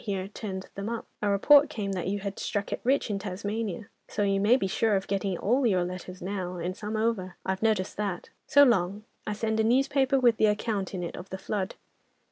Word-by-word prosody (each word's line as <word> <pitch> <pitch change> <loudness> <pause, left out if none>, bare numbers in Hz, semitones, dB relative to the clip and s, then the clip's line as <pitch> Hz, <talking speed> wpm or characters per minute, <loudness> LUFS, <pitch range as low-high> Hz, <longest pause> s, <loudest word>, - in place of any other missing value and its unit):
here 195 -3 -2
turned 195 -2 -6
them 200 +2 -4
up. 235 -1 -4 0.2
A 205 - +1
report 285 +9 +6
came 210 -9 -3
that 180 -3 -2
you 200 +1 -1
had 200 0 -5
struck 205 -1 -2
it - - -4
rich 260 -2 +2
in 200 - -1
Tasmania, 205 +1 -4 0.2
so 205 - -1
you 195 -1 +2
may 210 +5 +5
be 225 - -1
sure 210 +3 +1
of 190 - 0
getting 195 -2 -1
all 245 +7 +2
your 185 -4 +2
letters 180 0 -7
now 185 -2 -3
and 175 +2 -3
some 215 +1 -4
over. 210 -5 -1
I've 190 0 -1
noticed 215 -4 +1
that. 200 -4 -3 0.2
So 285 -1 +7
long. 205 -5 +2 0.2
I 210 - 0
send 220 +1 -1
a - - +4
newspaper 270 +3 +3
with 240 -3 +4
the 215 - +4
account 210 -2 -1
in 180 - -3
it 170 - -5
of 180 - -9
the 190 - -5
flood. 195 0 -3
205 Hz, 225 wpm, -28 LUFS, 190-225 Hz, 0.2 s, So